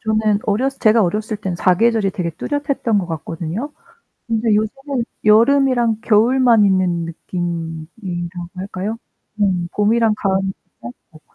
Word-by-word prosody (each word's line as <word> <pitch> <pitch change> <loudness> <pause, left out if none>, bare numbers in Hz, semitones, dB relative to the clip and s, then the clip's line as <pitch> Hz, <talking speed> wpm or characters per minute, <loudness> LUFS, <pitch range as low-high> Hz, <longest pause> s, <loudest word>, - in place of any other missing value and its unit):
저는 215 -2 +1
어렸을 260 +6 0
제가 220 0 +4
어렸을 210 +4 -1
때는 190 -4 -4
사계절이 200 +3 +2
되게 175 -3 -3
뚜렷했던 280 - -1
것 180 - -2
같거든요. 165 - -5 0.6
근데 225 -1 +1
요즘은 255 +4 -2 0.2
여름이랑 240 +1 +4
겨울만 230 0 +4
있는 180 -3 +1
느낌이라고 175 +1 -5
할까요? 195 +3 -4 0.4
음. 180 -3 +1
봄이랑 220 +1 +3
가을이 195 -1 0 0.3
짧고. 125 +6 -12
210 Hz, 305 characters per minute, -19 LUFS, 175-230 Hz, 0.6 s, 제가